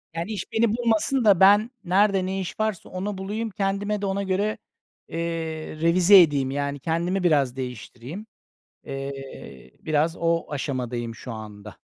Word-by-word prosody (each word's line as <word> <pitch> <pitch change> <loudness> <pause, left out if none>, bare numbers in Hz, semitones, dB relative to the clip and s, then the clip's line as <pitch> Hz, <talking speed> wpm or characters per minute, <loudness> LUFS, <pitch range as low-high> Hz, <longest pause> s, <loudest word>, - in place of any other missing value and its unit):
Yani 170 +6 -3
iş 215 - -5
beni 225 0 +2
bulmasın 235 +2 +1
da, 200 -4 +6
ben 205 +4 +6
nerede 195 +1 +3
ne 190 +1 -2
iş 185 +3 -6
varsa 215 -4 -2
onu 190 +2 -4
bulayım, 210 +4 -3
kendime 200 +1 -2
de - - -1
ona 195 +1 -1
göre, 200 +3 0 0.5
eee, 165 - -6 0.6
revize 180 +3 +7
edeyim. 140 -5 +2
Yani 140 0 -2
kendimi 170 +5 -1
biraz 140 -7 +2
değiştireyim. 130 - -7 0.6
Eee, 135 - -8
biraz 155 +2 +1
o 165 0 +1
aşamadayım 125 -5 -3
şu 125 - -8
anda. 105 -1 -9
175 Hz, 145 wpm, -24 LUFS, 135-205 Hz, 0.6 s, revize